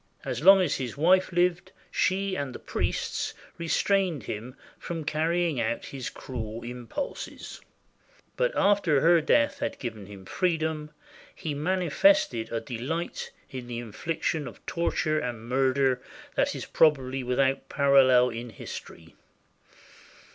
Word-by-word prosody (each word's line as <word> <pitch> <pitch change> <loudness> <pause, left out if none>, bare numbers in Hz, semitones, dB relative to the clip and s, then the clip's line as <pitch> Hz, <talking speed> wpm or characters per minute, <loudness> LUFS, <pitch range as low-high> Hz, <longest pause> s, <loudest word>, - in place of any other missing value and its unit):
As - - -3
long 195 +1 +9
as 180 - +1
his 125 -2 -5
wife 185 +5 +4
lived, 180 +1 +1 0.2
she 195 0 +1
and 140 -6 -4
the - - -4
priests - - -2 0.2
restrained 175 -1 +1
him 115 +4 -6 0.2
from 165 -2 -5
carrying 160 -1 0
out 115 +1 -2
his 135 -3 -5
cruel 115 -3 -6
im 120 0 -7
pulses; 285 - -6 0.7
but - - +1
after 190 -9 +3
her 170 0 +5
death 280 - +2
had - - -2
given 110 -6 -6
him 100 -2 -11
freedom, 160 - -1 0.5
he 155 - -4
mani 180 +5 0
fested 155 - +3
a 115 - -1
delight 140 +8 -4 0.2
in 130 -2 -6
the 120 -1 -5
infliction 145 +5 -3
of 120 - -12
torture 155 -2 0
and 120 -3 -5
murder 130 0 +2 0.3
that - - +1
is - - -5
probably 135 -4 +2
without 130 +2 0
parallel 130 -3 +5
in 120 +1 -6
history. 85 -5 -9
140 Hz, 135 wpm, -27 LUFS, 125-170 Hz, 0.7 s, long